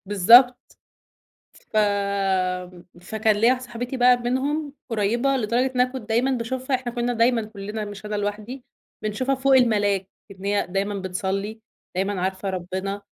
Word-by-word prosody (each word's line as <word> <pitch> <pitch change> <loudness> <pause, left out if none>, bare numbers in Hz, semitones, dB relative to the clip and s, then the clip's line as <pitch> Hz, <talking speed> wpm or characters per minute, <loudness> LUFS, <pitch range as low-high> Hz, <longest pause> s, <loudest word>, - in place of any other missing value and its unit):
بالضبط، 230 +6 +5 0.8
ف 215 - -7 1.2
فكان 220 +3 0
ليّا 225 +3 +4
واحدة 255 0 +2
صاحبتي 245 +2 -5
بقى 250 0 +5
منهم 275 +5 -2 0.2
قريّبة 235 +5 +1
لدرجة 235 +2 +1
إن 250 - +4
أنا 250 0 +1
كنت 250 -4 -8
دايمًا 240 +4 +2
باشوفها، 260 +2 -1
إحنا 250 -1 -4
كنّا 240 +1 -1
دايمًا 235 0 +2
كلّنا 210 0 -6
مش 205 0 -9
أنا 210 0 -3
لوحدي 210 +5 -4 0.4
بنشوفها 255 +6 -1
فوق 270 +1 +2
الملاك، 205 -6 +2 0.2
إن 190 0 -11
هي 200 0 0
دايمًا 195 +2 -1
بتصلي، 195 +3 -3 0.4
دايمًا 195 0 -1
عارفة 190 +1 -2
ربنا، 190 +2 -4
220 Hz, 145 wpm, -23 LUFS, 200-250 Hz, 1.2 s, بالضبط